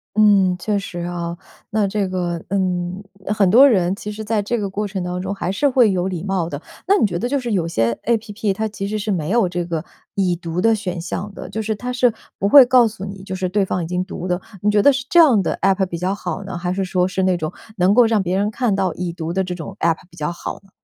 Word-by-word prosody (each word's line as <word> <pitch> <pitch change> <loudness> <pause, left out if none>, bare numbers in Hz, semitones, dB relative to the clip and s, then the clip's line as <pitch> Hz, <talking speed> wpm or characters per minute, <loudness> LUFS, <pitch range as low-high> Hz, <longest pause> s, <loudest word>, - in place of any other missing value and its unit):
嗯， 200 -4 +5
确 205 +3 -1
实 180 -3 -7
啊。 170 0 -4 0.3
那 215 -3 +1
这 200 0 -1
个 175 -2 -2
嗯， 185 0 -1 0.2
很 205 -1 +2
多 255 +8 +8
人 190 -7 +2
其 210 +1 -6
实 215 +1 -6
在 215 0 0
这 220 +4 -1
个 200 -2 -2
过 205 +2 -3
程 190 -2 -4
当 180 0 -3
中 190 +2 -3
还 185 - -2
是 285 +9 +2
会 250 -5 +4
有 185 -1 0
礼 180 -3 -4
貌 190 -4 -1
的。 145 - -5 0.3
那 400 - +5
你 - - +3
觉 175 -4 -2
得 245 - -2
就 280 +1 +1
是 240 -2 -4
有 180 -5 0
些 115 -8 +1
APP 220 -2 -1
它 220 +3 -2
其 200 -2 -5
实 215 - -2
是 210 0 -2
没 165 -5 -1
有 230 -1 +3
这 175 0 -2
个 165 -2 -3 0.3
已 185 -3 +1
读 170 0 -4
的 225 +4 +4
选 185 -5 -3
项 185 +4 -4
的， - - -8
就 220 - -3
是 220 0 -2
它 250 +4 -4
是 245 -1 +3 0.3
不 200 - +1
会 275 +2 +10
告 245 -2 +5
诉 210 -3 -7
你， 195 -1 -8
就 190 -1 -5
是 185 0 -1
对 200 +2 +1
方 185 -2 -2
已 160 - -4
经 180 +1 -1
读 185 -1 -6
的， 180 -1 0 0.2
你 210 - +2
觉 205 -1 +4
得 285 - +6
是 260 -2 -3
这 345 - +5
样 270 -11 +6
的 - - -1
App 195 0 +3
比 175 -2 -5
较 185 +3 -1
好 185 -1 -5
呢？ 190 -2 -6
还 180 +1 -2
是 195 +1 -1
说 180 -1 +1
是 190 0 -2
那 185 -1 +2
种 155 -2 -3 0.3
能 185 +2 +4
够 245 +1 +6
让 220 -3 +2
别 185 +1 0
人 205 +1 +1
看 220 -2 0
到 190 -3 0
已 175 -1 -3
读 165 -1 -4
的 190 +1 +1
这 180 - -4
种 180 +2 -7
App 165 -1 +2
比 170 - -19
较 150 +1 -2
好 175 - -6
呢？ 195 - -23
195 Hz, 310 characters per minute, -20 LUFS, 180-215 Hz, 0.3 s, 会